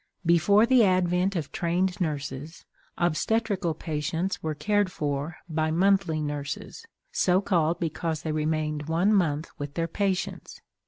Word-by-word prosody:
Before 175 +6 +5
the 250 -1 +5
advent 185 0 +2
of 160 -5 -3
"Trained 180 +2 0
Nurses," 145 0 -4 0.3
obstetrical 180 +1 0
patients 160 +4 -2
were 155 -1 -2
cared 205 +2 +1
for 145 +1 -3
by 155 -1 0
"Monthly 180 -1 +2
Nurses," 145 - -5 0.3
so 180 0 +3
called 170 -4 +1
because 160 -1 -2
they 160 - -2
remained 155 -1 -1
one 175 +6 +3
month 160 -5 +1
with 145 0 -5
their 165 -1 0
patients. 195 +2 -2
165 Hz, 130 wpm, -27 LUFS, 155-190 Hz, 0.3 s, Before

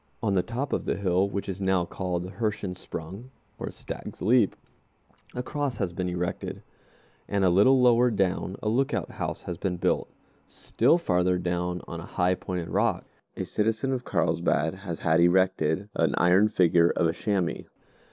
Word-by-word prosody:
On 100 -3 +1
the 95 - +3
top 120 +9 -4
of - - -1
the - - 0
hill, 95 0 +1
which 100 0 -4
is 95 0 -5
now 95 -2 +2
called 90 0 -3
the 90 - -7
Hirschensprung 100 0 -5 0.4
(stag's - - -8
leap), 115 0 +3 0.8
a 125 - -2
cross 145 -3 -3
has 95 -4 -2
been 90 0 -2
erected, 90 0 -4 0.6
and 100 -2 +1
a 90 - +4
little 115 +9 +5
lower 125 0 +5
down 95 -3 -1
a - - -1
lookout 130 +5 0
house - - -4
has 85 -2 -5
been 90 -3 -2
built. - - 0 0.4
Still 135 +9 +2
farther 90 - +1
down, 90 0 -2
on - - -6
a - - -8
high 90 +1 +1
pointed 90 -2 -4
rock, - - 0 0.3
a - - -2
citizen 110 +5 0
of 125 -1 -3
Carlsbad 80 -7 +1
has 95 -3 -7
had 80 0 +3
erected 95 0 +2
an - - +1
iron 95 +4 +4
figure 85 -4 +4
of 85 - +1
a 80 - +2
chamois. 95 -1 -1
95 Hz, 170 wpm, -27 LUFS, 90-110 Hz, 0.8 s, little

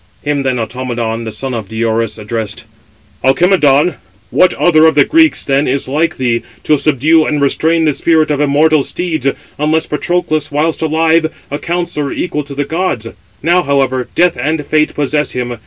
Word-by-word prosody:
Him 145 -1 -1
then 130 -2 -1
Automedon, 115 -1 -3
the 110 - -5
son 135 +3 -5
of 110 -4 -4
Diores, 110 0 -1
addressed: 110 0 -5 0.6
"Alcimedon, 150 +2 +3 0.3
what 185 -1 +4
other 160 -2 +4
of 160 - +2
the 145 - +5
Greeks, 320 0 +3
then, 140 +1 +1
is 135 +1 -1
like 160 +5 0
thee, 120 -2 0 0.2
to 155 - +3
subdue 155 +2 +2
and 150 -1 0
restrain 160 +3 +2
the 150 - +2
spirit 155 +1 +1
of 145 -1 0
immortal 150 +1 +3
steeds, 160 -2 -3 0.3
unless 155 +2 +1
Patroclus, 155 -1 -1
whilst 155 +3 0
alive, 160 +1 +2 0.2
a 145 - -3
counsellor 170 -4 -3
equal 150 -4 -3
to 140 -1 -8
the 145 0 -1
gods? 160 -10 -2 0.3
Now, 175 +3 +3
however, 135 -4 0
death 175 0 +3
and 150 +4 -2
fate 155 +1 +1
possess 150 +1 -1
him. 120 -1 -4
150 Hz, 170 wpm, -14 LUFS, 130-160 Hz, 0.6 s, the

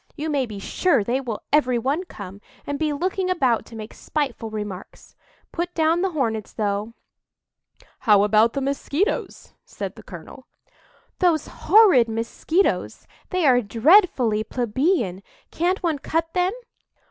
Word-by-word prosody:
You 310 0 -3
may 275 -4 0
be 210 -2 -8
sure 230 - +1
they 245 +6 -1
will 235 -5 -5
every 255 -5 +3
one 275 +10 -1
come, 200 - -10 0.2
and 285 0 -4
be 310 -1 0
looking 365 +5 -1
about 260 -10 +1
to 230 - -12
make 215 0 -8
spiteful 270 -7 -3
remarks. 210 -3 -8 0.4
Put 350 +1 -4
down 325 +1 +2
the 385 - +1
Hornets, 230 - -2
though." 210 +1 -2 1.0
"How 210 -4 +4
about 215 +2 +3
the 275 - -2
Mosquitoes!" 280 - -2
said - - -6
the - - -12
colonel. - - -12 0.7
"Those 340 -5 +2 0.2
horrid 380 - +6
Mosquitoes—they 320 - -2
are 250 -3 +5
dreadfully 235 - +3
plebeian! 240 - -1 0.3
Can't 360 +4 -1
one 320 -4 0
cut 330 +3 -2
them?" 365 +1 +1
270 Hz, 135 wpm, -23 LUFS, 220-335 Hz, 1.0 s, horrid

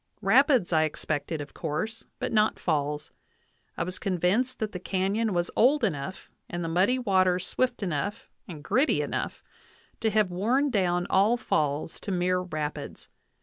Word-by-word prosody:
Rapids 240 - +4
I 160 - +4
expected 155 0 -2
of 145 - -9
course, 180 +9 -3
but - - -3
not 215 0 +3
falls. 150 -2 -1 0.7
I - - 0
was 185 +1 -5
convinced 200 +7 +1
that 215 -1 -3
the 180 - -5
canyon 195 +5 0
was 175 -1 0
old 265 +4 +4
enough 165 -3 -3 0.2
and 175 0 -3
the - - -2
muddy 185 +10 +2
water 185 -6 +3
swift 240 +5 -1
enough 195 +5 -3 0.2
and 155 -6 -9
gritty 265 - +2
enough - - -4 0.6
to 225 - +1
have 210 -3 +2
worn 245 +10 +1
down 180 -4 +1
all 205 +5 +4
falls 150 - -1
to 200 - -5
mere 180 0 +1
rapids. 155 -5 -5
185 Hz, 155 wpm, -27 LUFS, 170-220 Hz, 0.7 s, Rapids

